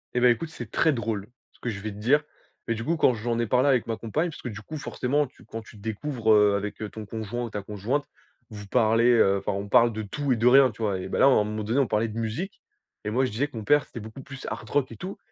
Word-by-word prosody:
Eh - - +3
beh, 125 0 +6
écoute, 150 +7 -2
c'est 160 - -8
très 160 -2 +3
drôle 110 -4 -3 0.3
ce - - -26
que 120 - -3
je 100 -3 -4
vais 110 +1 -5
te 100 - -10
dire 135 +8 +3 0.5
mais 115 - +2
du 115 +1 -5
coup, 170 - +1
quand 145 -5 +4
j'en 115 +1 -2
ai 120 - +1
parlé 125 +5 +3
avec 130 -4 +3
ma 115 -1 -2
compagne, 150 +10 -1
parce 155 - -10
que - - -6
du 110 -3 -6
coup, 155 +8 -7
forcément, 145 0 0
tu 130 - -20
quand 115 0 -7
tu 110 - -15
te 100 - -14
découvres, 110 +2 -1
heu, 105 -1 +5
avec 100 +1 -3 0.2
ton 110 -1 -7
conjoint 110 +3 -4
ou 120 - -4
ta 105 - -4
conjointe, 105 +8 -2 0.5
vous 105 -1 -8
parlez, 115 +2 +4
heu, 100 -4 +4
enfin, 95 - -2
on 100 +1 -3
parle 120 +3 +5
de 110 0 -4
tout 140 +7 -2
et 125 - +3
de 115 +2 +3
rien, 130 0 +7
tu 110 - -13
vois, 100 -3 0
eh 95 - -6
beh, - - -2
là, - - +7
à - - +8
un 130 -6 +5
moment 105 0 -3
donné, 115 +6 +1
on 135 - +3
parlait 110 +2 +1
de 110 0 -7
musique 115 - -4 0.4
et 105 - -2
moi 125 +5 +2
je 130 - -3
disais 125 +8 0
que 130 - -9
mon 110 - -6
père 145 +2 +4
c'était - - -9
beaucoup 110 +5 -9
plus 135 -1 -9
Hard - - -6
Rock 140 -2 +1
et - - -9
tout 185 +2 -6
115 Hz, 300 wpm, -26 LUFS, 105-130 Hz, 0.5 s, à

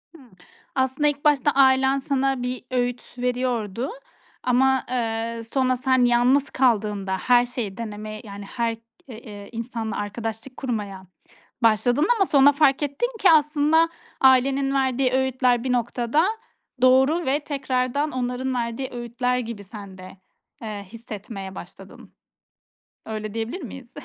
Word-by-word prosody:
Hımm, 270 -6 -16 0.5
aslında 265 +3 +1
ilk 290 +1 -3
başta 290 -1 +4
ailen 265 0 +4
sana 270 -1 0
bir 250 0 -4
öğüt 245 -1 -1 0.2
veriyordu 245 -2 -1 0.5
ama, 265 +1 +2
eee, 230 -1 -2
sonra 255 -1 +2
sen 260 0 +2
yalnız 245 +4 +3
kaldığında 210 -6 +1
her 245 +4 +4
şeyi 235 -6 -5
deneme, 215 -1 -6
yani 200 -1 -8
her 230 +2 -2 0.3
eee, 220 -3 -10
ııı, 200 - -12
insanla 230 -1 -4
arkadaşlık 225 +4 -5
kurmaya 205 -7 -4 0.6
başladın 245 +5 +3
ama 390 -3 +2
sonra 285 -2 +6
fark 280 -1 +3
ettin 290 - -1
ki 385 - +6
aslında 305 +1 +4 0.3
ailenin 270 +1 +4
verdiği 260 -1 +1
öğütler 260 -2 +1
bir 255 - 0
noktada 240 +5 +1 0.6
doğru 265 +6 +4
ve 275 +3 +1
tekrardan 275 0 -1
onların 255 +1 -2
verdiği 240 +2 -3
öğütler 245 +1 -1
gibi 230 -4 -6
sen 200 -2 -10
de, 185 +1 -12 0.4
eee, 210 -2 -6
hissetmeye 205 -3 -8
başladın. 190 +2 -12 0.9
Öyle 215 -1 -5
diyebilir 225 +11 -4
miyiz? 255 -1 -9
250 Hz, 130 wpm, -23 LUFS, 225-265 Hz, 0.9 s, sonra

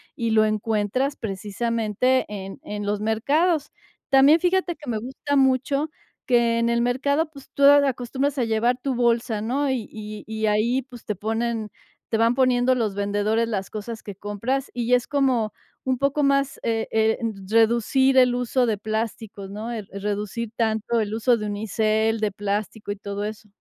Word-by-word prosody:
y 230 -1 -1
lo 220 -1 +4
encuentras, 215 +5 0
precisamente, 225 +4 -1
en 195 -1 -7
en 205 0 -5
los 205 0 -1
mercados. 290 +9 +1 0.4
También 280 +4 +6
fíjate 360 -1 +1
que 295 -5 -10
me 225 - -1
gusta 265 +5 -2
mucho 270 +3 +2 0.4
que 235 -2 +3
en 235 - +1
el 235 0 +2
mercado, 280 +6 +1
pues, 275 -3 -14
tú 280 - -1
acostumbras 275 0 +3
a - - +2
llevar 230 +2 +1
tu 265 +1 -2
bolsa, 235 -2 +1
¿no? 270 +6 0
Y 245 -5 -2
y 215 -1 -8
y 220 0 -2
ahí, 230 +5 +2
pues, 245 -2 -14
te 210 - -2
ponen 225 +1 -2 0.4
te 225 - +1
van 230 +2 +3
poniendo 255 -1 +3
los 225 -5 -1
vendedores 205 +3 0
las 195 -4 -3
cosas 220 +1 -6
que 205 - -8
compras, 230 +8 -3
y 245 0 0
es 245 - -1
como 260 -6 +1 0.3
un 260 -1 +1
poco 280 +2 +1
más, 275 0 +1
eh, 225 -1 -1
eh, 220 0 +2 0.3
reducir 235 +4 +3
el 250 -1 +5
uso 250 +1 +1
de 220 -3 0
plásticos, 215 -2 -4
¿no? 215 +4 -5
Eh, 230 - -3
el 200 - -8
reducir 210 +2 -3
tanto 225 0 0
el 210 -1 -2
uso 230 +2 +2
de 210 - -4
unicel, 220 +1 0
de 215 -1 0
plástico 205 +1 -3
y 205 - -4
todo 200 0 -5
eso. 215 0 -6
230 Hz, 175 wpm, -24 LUFS, 215-260 Hz, 0.4 s, También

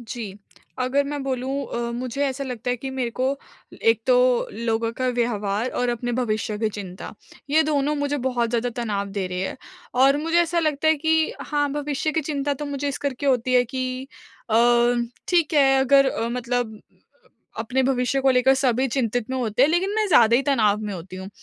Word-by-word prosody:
जी। 225 -4 -7 0.5
अगर 275 +3 +1
मैं 290 0 -4
बोलूँ 265 0 -2 0.2
अ, 235 0 -2
मुझे 250 +3 -3
ऐसा 275 +1 -3
लगता 250 -1 -4
है 245 - 0
कि 265 +3 -6
मेरे 255 -3 -2
को 260 - +2 0.6
एक 455 0 +3
तो - - +5 0.4
लोगों 230 0 -1
का 255 - +1
व्यवहार 215 -1 0
और 245 - +1
अपने 240 0 -2
भविष्य 220 -3 -1
की 220 0 +1
चिंता, 190 -3 -8 0.4
ये 315 +2 +5
दोनों 295 -1 0
मुझे 285 0 -1
बहुत 240 -2 0
ज़्यादा 240 +1 0
तनाव 200 -3 -2
दे 190 -2 -1
रहे 180 0 -4
हैं - - -7 0.5
और 275 +1 +5
मुझे 330 +1 +2
ऐसा 340 +1 -1
लगता 310 -1 +1
है 315 - +5
कि 320 0 +2
हाँ, 290 -1 -1
भविष्य 295 +1 -2
की 320 - +1
चिंता 285 -1 -2
तो 295 +2 -6
मुझे 285 0 -3
इस 280 - -3
करके 280 0 -3
होती 255 -1 +2
है 245 - +5
कि 255 +1 -4 0.5
अ, 220 - +1 0.7
ठीक 340 -3 +2
है 270 -2 +5
अगर 275 0 +4 0.2
मतलब 245 -3 -2 0.8
अपने 245 +4 0
भविष्य 260 +1 +1
को 265 0 +3
लेकर 255 +1 +4
सभी 260 -1 +1
चिंतित 245 -1 -1
में 260 - -1
होते 245 -1 +1
हैं, 285 - +5
लेकिन 365 +4 +1
मैं 435 -1 +1
ज़्यादा 235 - +6
ही 265 - +1
तनाव 220 -8 +2
में 210 -1 -4
होती 185 +2 -9
हूँ। 190 0 -7
255 Hz, 195 wpm, -23 LUFS, 235-285 Hz, 0.8 s, ज़्यादा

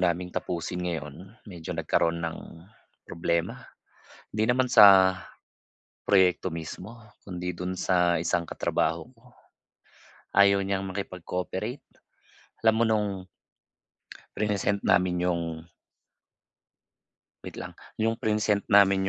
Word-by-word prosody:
naming 90 0 0
tapusin 90 +1 -4
ngayon, 90 - -6
medyo 90 -6 -7
nagkaroon 85 0 +1
ng 85 -1 -4 0.7
problema. 85 0 -2 0.6
Hindi 110 +1 -1
naman 130 0 +1
sa 95 -5 +7 0.9
proyekto 95 -2 +3
mismo, 90 +8 -8 0.2
kundi 90 -2 -5
do'n 90 +1 -4
sa 90 -2 +1
isang 85 0 0
katrabaho 80 +5 -2
ko. 125 +2 -22 1.1
Ayaw 100 0 +6
niyang 95 0 -2
makipag-cooperate. 95 +4 -5 0.8
Alam 110 -1 +4
mo 115 - +3
no'ng 110 -2 +1 1.3
prinesent 100 -1 0
namin 90 -1 +3
yung 85 -1 0 2.0
Wait - - -8
lang, - - -7 0.2
'yong 115 +1 -1
prinesent 105 -1 +1
namin 100 -2 +5
95 Hz, 100 wpm, -27 LUFS, 90-105 Hz, 2.0 s, sa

